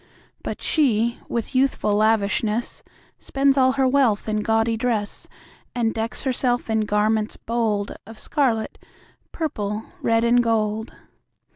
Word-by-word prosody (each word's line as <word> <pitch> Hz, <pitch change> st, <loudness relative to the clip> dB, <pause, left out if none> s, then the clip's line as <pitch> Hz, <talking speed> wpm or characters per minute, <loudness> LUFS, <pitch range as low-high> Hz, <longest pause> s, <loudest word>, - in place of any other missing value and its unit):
But -, -, -6 dB
she, 235 Hz, -6 st, +1 dB
with 235 Hz, +3 st, -3 dB
youthful 260 Hz, -5 st, +1 dB
lavishness, 215 Hz, +1 st, +1 dB, 0.4 s
Spends 275 Hz, 0 st, +1 dB
all 260 Hz, -1 st, +4 dB
her 265 Hz, -1 st, +2 dB
wealth 255 Hz, -7 st, +2 dB
in 215 Hz, 0 st, 0 dB
gaudy 225 Hz, +1 st, +1 dB
dress, 225 Hz, -3 st, -2 dB, 0.5 s
And 230 Hz, -2 st, 0 dB
decks 225 Hz, 0 st, -4 dB
herself 245 Hz, -3 st, 0 dB
in 220 Hz, -1 st, +1 dB
garments 215 Hz, +1 st, +1 dB
bold 220 Hz, -3 st, -1 dB
Of 225 Hz, 0 st, -11 dB
scarlet, 240 Hz, -7 st, -1 dB, 0.5 s
purple, 215 Hz, -10 st, -3 dB, 0.2 s
red, 230 Hz, 0 st, +2 dB
and 240 Hz, +1 st, +4 dB
gold. 220 Hz, -1 st, 0 dB
225 Hz, 125 wpm, -23 LUFS, 215-250 Hz, 0.5 s, all